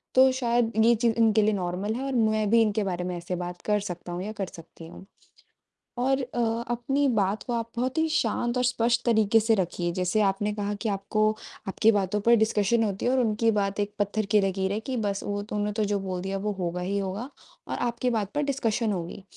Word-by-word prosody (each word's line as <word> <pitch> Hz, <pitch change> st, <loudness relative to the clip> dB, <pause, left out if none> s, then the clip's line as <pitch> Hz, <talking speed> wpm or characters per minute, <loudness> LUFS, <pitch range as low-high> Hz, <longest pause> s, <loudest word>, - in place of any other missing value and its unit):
तो 260 Hz, 0 st, +7 dB
शायद 240 Hz, -2 st, +1 dB
ये 235 Hz, -, +6 dB
चीज़ 230 Hz, 0 st, +1 dB
इनके 220 Hz, -1 st, +4 dB
लिए 215 Hz, +1 st, +2 dB
नॉर्मल 185 Hz, +2 st, -2 dB
है 250 Hz, +4 st, -4 dB
और 270 Hz, 0 st, -3 dB
मैं 215 Hz, -2 st, +2 dB
भी 230 Hz, +1 st, +5 dB
इनके 215 Hz, -1 st, +1 dB
बारे 180 Hz, -2 st, -2 dB
में 180 Hz, 0 st, -3 dB
ऐसे 175 Hz, +1 st, -4 dB
बात 175 Hz, 0 st, -6 dB
कर 210 Hz, 0 st, +1 dB
सकता 175 Hz, -3 st, -6 dB
हूँ 175 Hz, +2 st, -4 dB
या 215 Hz, -, -4 dB
कर 195 Hz, -3 st, -4 dB
सकती 165 Hz, 0 st, -12 dB
हूँ। 180 Hz, -, -12 dB, 0.9 s
और 265 Hz, +2 st, +1 dB
अ, 235 Hz, -2 st, -1 dB
अपनी 270 Hz, +4 st, +1 dB
बात 210 Hz, -4 st, +1 dB
को 245 Hz, -, -4 dB
आप 230 Hz, -1 st, -2 dB
बहुत 255 Hz, +5 st, -2 dB
ही 320 Hz, -, +3 dB
शांत 240 Hz, -5 st, 0 dB
और 250 Hz, -, +1 dB
स्पष्ट 240 Hz, -1 st, +1 dB
तरीके 220 Hz, -2 st, +4 dB
से 225 Hz, +1 st, +3 dB
रखिए, 175 Hz, -2 st, -1 dB
जैसे 180 Hz, +4 st, 0 dB
आपने 205 Hz, +1 st, +1 dB
कहा 205 Hz, 0 st, -2 dB
कि 225 Hz, -, -1 dB
आपको 210 Hz, +2 st, +1 dB, 0.4 s
आपकी 215 Hz, +3 st, +3 dB
बातों 205 Hz, -1 st, 0 dB
पर 235 Hz, +2 st, +5 dB
डिस्कशन 220 Hz, 0 st, +2 dB
होती 200 Hz, -3 st, -2 dB
है 245 Hz, -, +3 dB
और 260 Hz, -, +2 dB
उनकी 225 Hz, -1 st, +2 dB
बात 200 Hz, -1 st, -1 dB
एक 205 Hz, 0 st, -1 dB
पत्थर 205 Hz, +1 st, 0 dB
की 210 Hz, -, +6 dB
लकीर 190 Hz, 0 st, 0 dB
है 210 Hz, -, -1 dB
कि 255 Hz, +3 st, -4 dB
बस 200 Hz, -1 st, -2 dB
वो 205 Hz, 0 st, -2 dB
तुमने 210 Hz, 0 st, -1 dB
तो 215 Hz, -, 0 dB
जो 200 Hz, -, +1 dB
बोल 185 Hz, -2 st, -4 dB
दिया 195 Hz, +1 st, -3 dB
वो 210 Hz, +2 st, -2 dB
होगा 175 Hz, 0 st, -2 dB
ही 195 Hz, +3 st, -1 dB
होगा, 195 Hz, +7 st, -4 dB, 0.4 s
और -, -, -3 dB
आपकी 240 Hz, +1 st, -1 dB
बात 210 Hz, -4 st, -1 dB
पर 295 Hz, -, +1 dB
डिस्कशन 235 Hz, -5 st, 0 dB
होगी। 185 Hz, +1 st, -5 dB
210 Hz, 230 wpm, -26 LUFS, 195-235 Hz, 0.9 s, तो